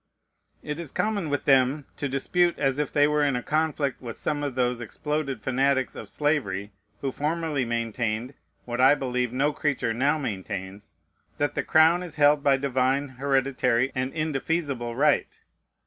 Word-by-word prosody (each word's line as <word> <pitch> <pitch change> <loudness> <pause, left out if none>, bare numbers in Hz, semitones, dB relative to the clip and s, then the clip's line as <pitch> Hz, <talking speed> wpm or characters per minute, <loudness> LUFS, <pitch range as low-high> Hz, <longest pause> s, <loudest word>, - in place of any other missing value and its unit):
It 150 +1 -4
is 165 -5 -6
common 205 -7 -1
with 145 -1 -2
them 135 +1 +3
to 145 - -2
dispute 170 +6 +1
as 135 -1 0
if 150 - -1
they 145 0 +4
were 150 0 +2
in 140 -3 +2
a 125 - -2
conflict 155 -3 -1
with 120 -3 -7
some 150 -1 -2
of 140 -3 -3
those 125 -1 0
exploded 140 0 -3
fanatics 130 +1 +1
of - - -8
slavery 145 -10 -1 0.3
who 135 - -1
formerly 150 -2 -1
maintained, 115 +1 -2 0.3
what 120 +1 -2
I 135 +3 +7
believe 125 -3 -1
no 140 +4 +1
creature 140 -7 -1
now 140 +6 +2
maintains, 100 -5 -6 0.4
"that 145 - 0
the - - 0
crown 160 +3 +4
is 175 -3 -7
held 145 -1 +4
by 140 -1 +4
divine, 135 +1 0
hereditary, 130 -1 +1
and 130 +1 -2
indefeasible 145 -5 -2
right." 145 +4 +1
135 Hz, 165 wpm, -26 LUFS, 125-150 Hz, 0.4 s, I